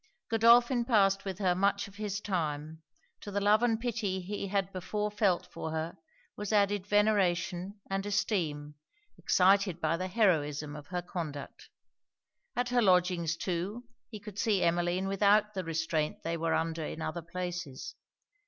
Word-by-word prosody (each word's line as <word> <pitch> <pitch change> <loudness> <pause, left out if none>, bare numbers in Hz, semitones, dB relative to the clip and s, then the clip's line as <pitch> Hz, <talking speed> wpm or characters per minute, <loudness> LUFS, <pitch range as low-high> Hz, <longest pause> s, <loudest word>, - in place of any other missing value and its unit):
Godolphin 235 +2 +5
passed 195 -5 +3
with 190 -2 -4
her 185 -3 +2
much 200 +2 +1
of 200 0 -15
his 210 -2 -3
time: 160 -5 -3 0.4
to - - -8
the 200 0 -1
love 205 +2 +4
and 230 -2 +2
pity 225 -5 -2
he 200 +2 -4
had 195 0 -1
before 210 +3 -2
felt 205 -4 +1
for - - -6
her, 160 +1 -3 0.4
was 210 0 -4
added 205 -2 +2
veneration 200 -2 +1
and 195 0 -2
esteem, 165 -8 -1 0.4
excited 190 -1 +3
by 165 0 0
the 185 +2 -3
heroism 150 -8 +1
of 145 -1 -10
her 180 -1 -3
conduct. 155 -5 -6 0.9
At 245 0 0
her 245 0 +3
lodgings, 180 -4 +2
too, 190 +7 -3 0.3
he 215 - -8
could 210 0 -9
see 205 -4 +2
Emmeline 175 +2 +1
without 205 +2 +3
the 190 -2 -3
restraint 160 -2 -2
they 165 +1 -1
were 165 0 0
under 165 0 -1
in 160 +1 -5
other 170 +2 -3
places. 175 -4 -5
190 Hz, 155 wpm, -30 LUFS, 170-205 Hz, 0.9 s, Godolphin